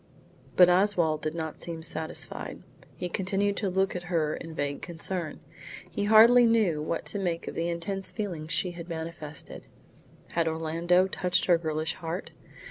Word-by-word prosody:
But 180 - +8
Oswald 180 -4 +3
did 155 +1 -3
not 160 -2 -5
seem 165 -1 -4
satisfied. 160 -1 -4 0.3
He 180 - -3
continued 195 +3 0
to 200 - 0
look 190 +1 +1
at 180 - -2
her 160 -4 +1
in 165 -1 -8
vague 145 -2 -2
concern. 170 0 -2 0.5
He 205 -3 -2
hardly 225 +3 +8
knew 210 -10 +2
what 160 +2 -2
to 205 - -1
make 175 -3 -2
of - - -4
the 170 +1 -1
intense 190 +3 -3
feeling 180 -8 -4
she 175 +2 0
had 175 0 -9
manifested. 160 -2 -6 0.6
Had 165 -1 0
Orlando 165 +3 +2
touched 180 -1 0
her 175 -2 +4
girlish 160 0 -1
heart? 165 +3 -5
170 Hz, 160 wpm, -28 LUFS, 160-190 Hz, 0.6 s, But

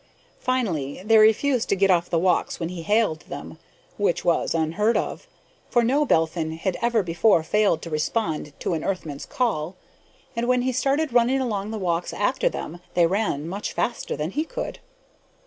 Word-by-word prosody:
Finally, 185 - -1
they 220 0 +6
refused 225 +4 +3
to - - +3
get 195 0 +3
off 175 -1 +2
the 170 - +1
walks 180 +1 +1
when 165 -1 -2
he 180 -2 -6
hailed 205 -3 +1
them 145 +3 -8 0.4
which 200 -4 0
was 170 -1 +1
unheard 165 +8 +1
of, - - -4 0.4
for 240 -2 +3
no 280 +6 +2
Belphin 160 - +1
had 175 +3 -2
ever 235 -2 +2
before 170 +1 +3
failed 200 -2 +2
to 170 - -6
respond 155 -1 -1
to - - -1
an 160 - -2
Earthman's 160 -7 -4
call 185 -9 -1 0.6
and 235 +1 -1
when 250 0 +2
he 260 - +1
started 275 +3 0
running 245 +2 +3
along 210 -6 -2
the 220 - -4
walks 175 -3 -1
after - - +1
them, 175 - -6 0.2
they 175 - +5
ran 170 -5 -1
much 195 +4 -4
faster 235 - -2
than 150 +3 -3
he 300 +7 -1
could. - - -6
195 Hz, 180 wpm, -24 LUFS, 165-235 Hz, 0.6 s, they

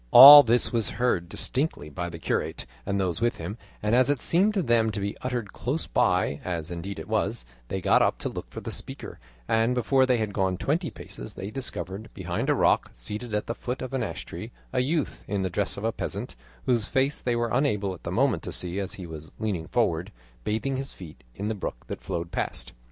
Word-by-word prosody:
All 140 - +13
this 120 -2 +2
was 115 -2 +3
heard 95 -8 +1
distinctly 130 - -1
by 85 +4 -4
the 85 - -7
curate 80 - -2 0.2
and 100 - 0
those 95 +1 -1
with 120 0 +1
him, 95 +8 -6 0.2
and 105 +1 +1
as 125 +2 +5
it 145 -3 +2
seemed 195 - +3
to 195 - +2
them 115 -4 +3
to 105 -1 -3
be 100 +1 -2
uttered 120 -5 -3
close 145 +6 -2
by, - - +1
as 85 -2 -3
indeed 95 +3 -5
it 80 - -7
was, - - 0 0.2
they 95 - -3
got - - +4
up - - +2
to - - -3
look - - -7
for - - -7
the - - -5
speaker, - - -6 0.3
and 115 +2 +2
before 130 +1 +3
they 125 -1 +3
had 110 -2 -2
gone 95 -2 0
twenty 160 - 0
paces - - -9
they 100 - -6
discovered 110 -5 -5
behind - - -2
a - - +4
rock, - - +3
seated 105 - -4
at 105 - -1
the 115 - -2
foot 125 +2 -4
of 130 - -6
an 135 - 0
ash - - -4
tree, 100 +8 -7 0.2
a 130 - +2
youth 145 +3 -1
in 100 -1 -1
the 95 - -2
dress 100 +4 -2
of 100 - -6
a 115 - +1
peasant, - - -5 0.3
whose 115 -4 +2
face 135 +1 +1
they 120 -1 0
were 120 -1 0
unable 105 -8 +1
at 90 - -11
the - - -5
moment - - +2
to - - -6
see 90 +2 -1
as 95 -2 -3
he 95 - -7
was 80 -2 -9
leaning 95 -7 -2
forward, - - 0 0.3
bathing 130 +6 -1
his 135 +1 -5
feet 85 -5 -12
in 100 - -3
the 110 - 0
brook 95 - -5
that - - -6
flowed 85 0 -4
past. - - -3
110 Hz, 230 wpm, -27 LUFS, 95-125 Hz, 0.3 s, All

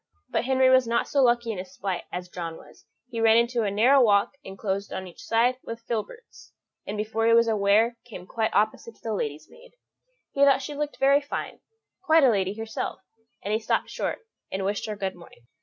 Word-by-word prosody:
But - - 0
Henry 260 0 +4
was 260 -2 +5
not 235 0 0
so 280 - +2
lucky 240 -2 +2
in 200 - -5
his 185 0 -9
flight 190 -3 -3
as 180 0 -5
John 170 -2 -6
was; - - -18 0.2
he 230 -1 -3
ran 225 0 +6
into 235 0 +2
a 210 - 0
narrow 245 +7 +4
walk 205 -4 +4
enclosed 195 +1 -4
on 190 - -5
each 180 - -12
side 240 +3 +2
with 230 0 -8
filberts, 245 - -6 0.3
and 205 - -4
before 220 +1 -1
he 230 - +5
was 230 0 +5
aware 220 +2 +3
came 205 -7 -10
quite 220 +3 -1
opposite 215 +2 0
to - - -28
the 225 - -2
lady's 150 -5 -4
maid. - - -18 0.6
He 280 - +2
thought 275 -1 +5
she 295 - -5
looked 295 0 -4
very 275 +1 +4
fine 285 - -5 0.4
quite 325 -4 +4
a 260 - +6
lady 195 -1 0
herself; 220 -4 -5 0.4
and 205 - -2
he 220 - +2
stopped 220 - -1
short, - - -4 0.3
and 190 0 -2
wished 205 +2 -2
her 215 - -4
good 195 -2 -3
morning. 170 -8 -17
225 Hz, 210 wpm, -26 LUFS, 200-250 Hz, 0.6 s, ran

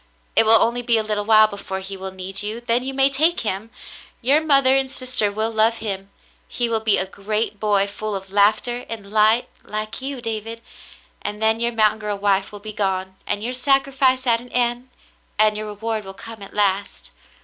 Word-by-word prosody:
It 225 - +4
will 225 0 +7
only 240 +1 +1
be 235 -1 +2
a 220 - +1
little 210 -1 -1
while 215 0 +7
before 200 -2 -5
he 190 +1 -7
will 190 0 -6
need 190 +1 -6
you, 210 +3 -4
then 240 0 +1
you 265 - -3
may 270 0 +4
take 310 +5 +1
him. 210 0 -3 0.5
Your 275 +5 +3
mother 275 -4 +4
and 270 -1 +1
sister 255 -5 -1
will 220 +2 -2
love 225 +1 +3
him. 195 -3 -5 0.4
He 240 - -1
will 225 -1 +1
be 220 -2 +3
a 190 - 0
great 210 +2 -3
boy 205 -2 +2
full 205 +1 -5
of 195 0 -7
laughter 215 +4 +2
and 210 -3 -7
light, 220 +2 +4 0.2
like 215 +3 -4
you, 270 0 -4
David, 225 0 -5 0.6
and 210 - -5
then 220 +1 +2
your 235 0 +1
mountain 220 -1 +2
girl 210 -1 -3
wife 195 -1 +1
will 205 - -8
be 215 +1 -8
gone 190 -2 -2
and 205 0 -1
your 245 +2 -2
sacrifice 265 0 +2
at 230 -2 +2
an 245 - -14
end, 245 +1 0 0.5
and 215 0 +4
your 215 0 -4
reward 215 +1 -4
will 195 0 -9
come 225 0 -10
at 195 - -10
last. 200 -1 -1
220 Hz, 205 wpm, -21 LUFS, 205-240 Hz, 0.6 s, will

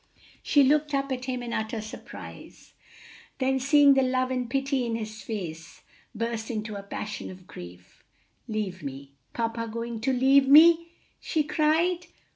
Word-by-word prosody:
She 290 -2 +4
looked 295 +1 +2
up 275 0 -1
at 255 -1 -3
him 250 -1 -3
in 235 -1 -5
utter 220 0 -2
surprise, 215 +1 -11 0.6
then 265 0 +1
seeing 280 +1 +6
the 270 - +3
love 255 0 0
and 250 -2 -2
pity 270 0 0
in 230 -1 -2
his 215 -1 -6
face, 170 -6 -7 0.3
burst 230 0 -3
into 215 -2 -4
a 200 - -5
passion 210 +1 -6
of 185 -1 -12
grief. 90 - -12 0.4
"Leave 210 -5 -3
me! 140 0 -8 0.2
papa 230 0 -2
going 230 0 -5
to 265 +3 +1
leave 265 +2 +4
me!" 330 +4 +7 0.3
she 310 - 0
cried. 325 +4 +1
245 Hz, 155 wpm, -27 LUFS, 215-275 Hz, 0.6 s, me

